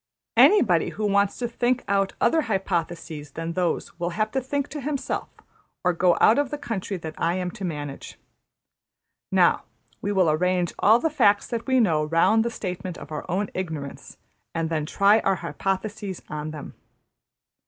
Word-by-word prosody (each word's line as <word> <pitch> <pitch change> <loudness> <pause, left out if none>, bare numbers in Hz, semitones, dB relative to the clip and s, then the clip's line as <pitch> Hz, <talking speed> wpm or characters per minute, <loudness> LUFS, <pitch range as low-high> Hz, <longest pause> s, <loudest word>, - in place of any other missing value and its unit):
Anybody 210 - +5
who 215 - -3
wants 200 -1 +2
to 240 - -2
think 245 +1 0
out 195 -1 +1
other 325 - +3
hypotheses 165 -6 -3
than 165 +1 -4
those 175 -1 -2
will 175 0 -1
have 215 0 0
to 265 - 0
think 280 +2 -2
to 295 - -6
himself, 280 0 -3 0.5
or 180 0 +3
go 175 +1 +3
out 225 +5 +5
of 285 -2 0
the 295 - -4
country 225 -8 -4
that 160 -2 -7
I 170 +1 +1
am 180 -1 -2
to 200 +1 -9
manage. 145 -5 -5 1.1
``Now - - +4 0.4
we 205 - -1
will 185 -5 +3
arrange 180 +2 +1
all 220 +3 +6
the 320 +5 -1
facts 210 -9 +3
that 235 -1 -4
we 260 -1 +3
know 165 -9 +3
round 165 +8 +3
the 235 - -1
statement 180 -5 -5
of 145 - -11
our 155 +3 -6
own 195 +3 -1
ignorance; 160 -7 -6 0.4
and 165 0 -1
then 155 -2 -1
try 200 +5 +4
our 195 -2 +1
hypotheses 190 +4 -3
on 150 0 -4
them. 155 -2 -8
190 Hz, 175 wpm, -25 LUFS, 165-225 Hz, 1.1 s, all